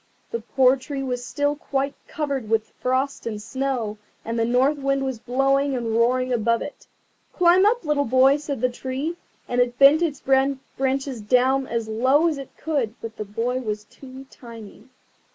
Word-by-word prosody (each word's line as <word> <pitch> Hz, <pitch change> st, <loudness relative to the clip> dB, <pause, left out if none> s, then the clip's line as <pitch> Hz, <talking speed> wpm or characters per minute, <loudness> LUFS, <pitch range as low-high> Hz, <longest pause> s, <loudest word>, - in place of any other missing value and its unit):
The 465 Hz, -, -2 dB
poor 265 Hz, -, +3 dB
tree 270 Hz, +1 st, -5 dB
was 250 Hz, -2 st, -3 dB
still 290 Hz, +3 st, -1 dB
quite 275 Hz, -1 st, -2 dB
covered 280 Hz, -7 st, -3 dB
with 220 Hz, -1 st, 0 dB
frost 260 Hz, 0 st, -1 dB
and 215 Hz, -2 st, -4 dB
snow, 240 Hz, -3 st, -3 dB, 0.3 s
and 230 Hz, +1 st, -2 dB
the 225 Hz, -, +2 dB
North 260 Hz, +5 st, +2 dB
Wind 275 Hz, 0 st, 0 dB
was 260 Hz, -4 st, -3 dB
blowing 270 Hz, +3 st, +1 dB
and 235 Hz, -3 st, -2 dB
roaring 255 Hz, +2 st, +2 dB
above 230 Hz, 0 st, +1 dB
it. 290 Hz, -, -10 dB, 0.5 s
"Climb 360 Hz, +2 st, +5 dB
up! 470 Hz, +1 st, +1 dB
little 295 Hz, -1 st, +1 dB
boy," 260 Hz, +3 st, +4 dB
said 290 Hz, -4 st, -5 dB
the 255 Hz, -, +2 dB
Tree, 265 Hz, +6 st, -4 dB, 0.3 s
and 245 Hz, 0 st, +1 dB
it 245 Hz, 0 st, 0 dB
bent 280 Hz, +4 st, +7 dB
its 300 Hz, -5 st, -1 dB
branches 270 Hz, -1 st, 0 dB
down 260 Hz, +4 st, +2 dB
as 230 Hz, -1 st, -2 dB
low 260 Hz, +9 st, +3 dB
as 305 Hz, -4 st, -1 dB
it 270 Hz, -, -8 dB
could; 275 Hz, -8 st, -2 dB
but 225 Hz, -1 st, -8 dB
the 215 Hz, -, -4 dB
boy 230 Hz, +5 st, -2 dB
was 210 Hz, -4 st, -4 dB
too 265 Hz, +4 st, -13 dB
tiny. 230 Hz, -1 st, -12 dB
260 Hz, 175 wpm, -23 LUFS, 235-275 Hz, 0.5 s, bent